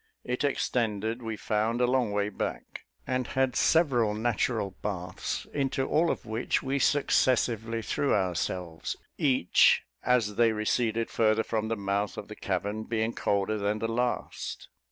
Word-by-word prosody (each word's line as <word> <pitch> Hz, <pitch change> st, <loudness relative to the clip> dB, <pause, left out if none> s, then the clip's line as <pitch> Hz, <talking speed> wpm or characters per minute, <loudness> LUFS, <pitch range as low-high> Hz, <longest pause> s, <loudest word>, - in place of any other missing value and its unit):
It 125 Hz, +2 st, -2 dB
extended, 115 Hz, -4 st, 0 dB
we 110 Hz, -2 st, -4 dB
found, 110 Hz, +3 st, 0 dB
a 125 Hz, -, +4 dB
long 125 Hz, -3 st, +1 dB
way 100 Hz, 0 st, 0 dB
back, 105 Hz, -, -5 dB, 0.2 s
and 130 Hz, -1 st, -1 dB
had 130 Hz, -1 st, 0 dB
several 125 Hz, -10 st, +3 dB
natural 110 Hz, -2 st, 0 dB
baths, 95 Hz, -4 st, -4 dB
into 135 Hz, -1 st, 0 dB
all 165 Hz, +2 st, +2 dB
of -, -, -2 dB
which 110 Hz, +1 st, -1 dB
we 135 Hz, +1 st, 0 dB
successively 120 Hz, -4 st, +2 dB
threw 145 Hz, -, 0 dB
ourselves, 90 Hz, -3 st, -1 dB, 0.2 s
each, 130 Hz, -, +4 dB, 0.2 s
as 115 Hz, -5 st, +1 dB
they 115 Hz, -1 st, +4 dB
receded 115 Hz, +1 st, 0 dB
farther 110 Hz, 0 st, +3 dB
from 110 Hz, -1 st, -2 dB
the 115 Hz, 0 st, -1 dB
mouth 100 Hz, 0 st, -1 dB
of -, -, -7 dB
the -, -, -7 dB
cavern, 105 Hz, +2 st, -2 dB
being 115 Hz, 0 st, -1 dB
colder 100 Hz, +2 st, 0 dB
than 100 Hz, +1 st, 0 dB
the 115 Hz, +1 st, -2 dB
last. 125 Hz, +1 st, -3 dB
115 Hz, 150 wpm, -28 LUFS, 105-125 Hz, 0.2 s, a